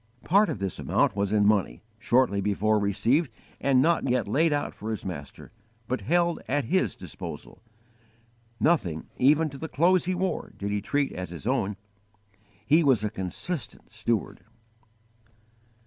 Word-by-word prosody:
Part 200 +3 +4
of 155 - -2
this 95 -2 -4
amount - - +1
was 100 -1 -1
in 105 -1 +3
money, 100 - +1 0.2
shortly 120 -4 +2
before 105 +2 +1
received 115 - +1 0.3
and 135 -2 +3
not 170 +2 +2
yet 125 -4 +1
laid 155 +9 +2
out 145 0 -1
for 110 - -7
his 110 - -4
Master, 75 -7 -8 0.4
but 130 - -2
held 170 +1 +1
at 145 -1 0
His 185 +8 +1
disposal. - - -9 1.0
Nothing, 95 - +1
even 150 +5 +4
to 135 - -9
the 160 - -5
clothes 175 +4 +3
he 185 0 0
wore, 185 +1 -2
did 100 +1 -3
he 105 0 -1
treat 145 +5 0
as 90 -2 -6
his 85 +2 -9
own. 105 -6 0 0.9
He 155 +6 +4
was 130 -7 +3
a 105 - -1
consistent 110 - -5
steward. 110 0 -2
120 Hz, 155 wpm, -27 LUFS, 100-155 Hz, 1.0 s, Part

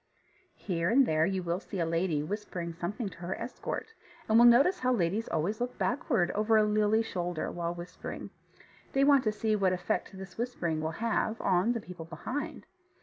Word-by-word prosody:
Here 170 -3 -1
and 260 +4 +5
there 155 -2 +2
you 190 -1 -1
will 170 +1 -1
see 195 -1 -6
a 165 - +2
lady 165 -2 0
whispering 175 -2 -4
something 185 +7 -3
to 170 - -14
her 180 +2 -4
escort, 255 - -5 0.3
and 220 +1 +5
will 240 - +9
notice 280 +11 +5
how 255 0 +1
ladies 205 0 0
always 180 +8 -1
look 245 0 -3
backward 240 - +1
over 215 +2 +3
a 215 - +5
lily 210 +1 +3
shoulder 175 -5 -3
while 170 0 -3
whispering. 175 +1 -7 0.6
They 270 - +3
want 280 -2 +5
to 215 - +3
see 215 0 0
what 190 -3 +2
effect 190 +1 -2
this 190 +3 -10
whispering 175 -10 -1
will 155 - -1 0.2
have 225 0 0
on 190 +5 +2
the 235 - -2
people 180 -4 -9
behind. 250 - -5
200 Hz, 190 wpm, -30 LUFS, 175-230 Hz, 0.6 s, will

